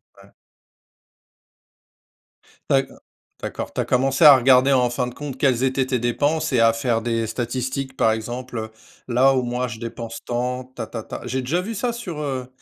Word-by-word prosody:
Ouais. - - -19 2.4
D'accord 135 0 +1 0.4
d'accord, - - -5
tu - - -6
as - - -3
commencé 135 +4 +2
à 145 -2 +11
regarder, 130 +1 +5
en 125 -2 +3
fin 120 +1 -1
de 125 - -7
compte, 145 -1 -7
quelles 130 -4 +2
étaient 130 0 +1
tes 130 -1 -1
dépenses 145 +7 0
et 125 - +3
à 115 0 +5
faire 115 0 0
des 115 -1 -1
statistiques, 130 +3 -3
par 110 - +3
exemple: 115 0 -5 0.4
«là 130 +2 +4
où 130 - +1
moi 125 +1 -2
je 110 -2 -8
dépense 115 0 -6
tant, 125 +1 -2
tatata», 120 -3 -7
j'ai 130 +2 -2
déjà 155 +8 0
vu 225 +5 -5
ça 240 +3 -1
sur, 185 -10 -6
heu, 135 -4 -3
125 Hz, 170 wpm, -22 LUFS, 120-135 Hz, 2.4 s, à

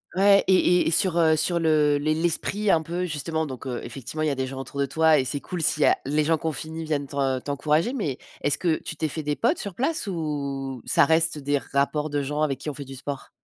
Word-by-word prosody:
ouais 200 +1 +5
et 180 -2 +4
et - - +1
sur, 175 +1 +2
heu, 160 -2 +4
sur 175 +2 +1
le 150 -3 +3
les 155 +2 0
l'esprit 175 +6 -1
un 165 -4 +4
peu 175 +3 -3
justement, 160 0 -2
donc 130 -3 -8
heu, 125 -2 -3
effectivement 125 +5 -6
il - - +1
y - - +2
a 140 - -1
des 130 0 -2
gens 135 0 -7
autour 140 +1 -7
de - - +2
toi 160 +3 +3
et 130 - +2
c'est 145 +2 -2
cool 175 +3 -5
s'il 150 -1 +3
y - - +6
a - - +4
les 150 +2 +1
gens 160 +1 +2
qu'on 160 +1 -2
finit 160 +3 -6
viennent 150 -3 -2
t'en 135 -2 -1
t'encourager 150 - 0
mais 155 - -2 0.2
est-ce 145 - +2
que 170 -3 +1
tu - - -5
t'es 160 - 0
fait 155 +1 -5
des 145 0 -1
potes 270 +9 +1
sur 200 -3 -5
place, 270 - -1
ou 140 -7 -4
ça - - +4
reste 160 0 +3
des 145 0 0
rapports 145 +3 -1
de 145 0 -1
gens 150 +2 -3
avec 140 -3 0
qui - - -5
ont 150 - -4
fait 140 +1 -7
du 135 - -9
sport? 140 +1 -6
155 Hz, 265 wpm, -25 LUFS, 140-165 Hz, 0.2 s, y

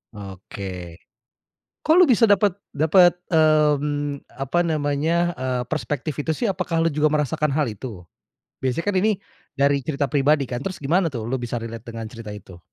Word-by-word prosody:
Oke. 95 -3 -8 0.9
Kok 315 - +4
lu 365 - +9
bisa 235 -2 +5
dapet 200 -2 +4 0.2
dapet, 175 +4 +5 0.2
mmm, 150 -3 +2 0.2
apa 135 +6 0
namanya, 160 +2 0
eee, 130 -1 -2
perspektif 150 -1 -3
itu 150 +2 -2
sih? 230 - -1
Apakah 180 -3 -1
lu 165 - +3
juga 150 0 +1
merasakan 150 +1 0
hal 150 -1 +1
itu? 105 -5 -8 0.6
Biasa 130 +5 -1
kan 205 - +1
ini, 210 0 +1 0.4
dari 140 0 +3
cerita 140 0 -1
pribadi 140 +2 +2
kan? 120 0 -4
Terus 185 - -4
gimana 165 +5 +1
tuh 115 -5 -5
lu 125 - -2
bisa 120 0 -3
relate 115 +1 -8
dengan 115 -1 -6
cerita 115 -2 -9
itu? 95 -3 -10
145 Hz, 165 wpm, -23 LUFS, 120-165 Hz, 0.9 s, lu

